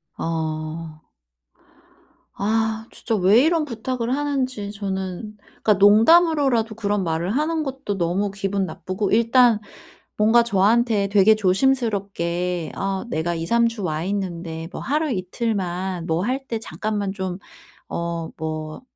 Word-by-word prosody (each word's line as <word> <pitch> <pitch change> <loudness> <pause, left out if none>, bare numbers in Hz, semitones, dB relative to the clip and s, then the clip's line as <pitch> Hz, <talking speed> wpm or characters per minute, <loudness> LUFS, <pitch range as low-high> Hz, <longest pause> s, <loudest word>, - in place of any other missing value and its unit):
어. 155 -1 -4 1.3
아 220 +1 0
진짜 230 - -2
왜 205 +5 +5
이런 320 0 +2
부탁을 245 0 -2
하는지 260 -8 -2
저는 195 0 -4 0.3
그니까 215 - +5
농담으로라도 230 - +4
그런 205 -2 -1
말을 165 +2 -1
하는 315 +2 0
것도 265 -7 -4
너무 185 +4 0
기분 195 0 -1
나쁘고 185 +2 -3
일단 230 0 +4 0.6
뭔가 225 +3 +5
저한테 220 0 +2
되게 205 +2 +5
조심스럽게 190 -6 0
"아 195 +2 -2
내가 170 -2 -1
2-3 230 +9 +2
주 230 -3 -5
와 155 -2 -2
있는데 170 -4 -4
뭐 - - -7
하루 300 +2 0
이틀만 185 -3 -2
뭐 165 +1 0
할 265 +3 -2
때 230 -3 -2
잠깐만 210 -2 -3
좀 190 -2 -4 0.5
어 170 -1 -3
뭐 155 +1 -5
205 Hz, 240 characters per minute, -22 LUFS, 180-235 Hz, 1.3 s, 왜